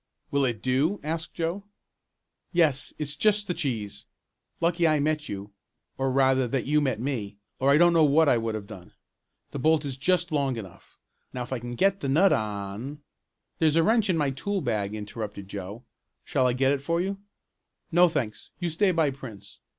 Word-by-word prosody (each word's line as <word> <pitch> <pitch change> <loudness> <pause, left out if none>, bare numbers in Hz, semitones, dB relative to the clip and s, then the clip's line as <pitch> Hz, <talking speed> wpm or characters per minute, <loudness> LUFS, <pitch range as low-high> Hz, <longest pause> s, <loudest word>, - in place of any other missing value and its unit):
"Will 140 -1 +2
it 115 -4 -2
do?" 140 +10 +1
asked 160 +1 -4
Joe. 170 +4 -2 0.9
"Yes, 155 -6 +2
it's 150 -1 -3
just 210 +5 +2
the 180 - -2
cheese. 120 - -4 0.5
Lucky 170 0 +2
I 155 -1 +3
met 150 +1 -1
you, 100 +1 -6 0.4
or, 135 0 0
rather 130 -1 +3
that 130 0 -1
you 150 +2 +2
met 130 -6 0
me, 115 -6 -3 0.2
or 135 - +2
I 140 - +6
don't 175 +1 +5
know 165 -1 +5
what 155 +2 +4
I 125 - +5
would 115 -1 -2
have 105 -2 -5
done. 95 -4 -12 0.6
The 140 - -5
bolt 155 +1 +3
is 135 -2 -4
just 175 +4 +1
long 140 -4 0
enough. 95 -6 -11 0.4
Now 125 - -3
if 120 - -6
I 130 - -2
can 120 +1 -6
get 195 +8 +2
the 140 - -3
nut 180 +8 +5
on 105 +7 -4 0.3
" - - -52
"There's 155 -2 +3
a 165 - +4
wrench 220 +2 +3
in 175 - +2
my 145 -3 +1
tool 195 +9 -2
bag," 110 -6 -1
interrupted 105 -2 -6
Joe. 100 +4 -7 0.4
"Shall 130 - +1
I 125 - +2
get 135 +2 +2
it 140 -1 0
for 165 +4 0
you?" 195 +2 -2 0.7
"No, 175 +2 +6
thanks, 120 -10 -3
you 175 -2 -2
stay 195 +5 +2
by 160 -5 +2
Prince. 125 -7 -11
140 Hz, 195 wpm, -26 LUFS, 120-165 Hz, 0.9 s, I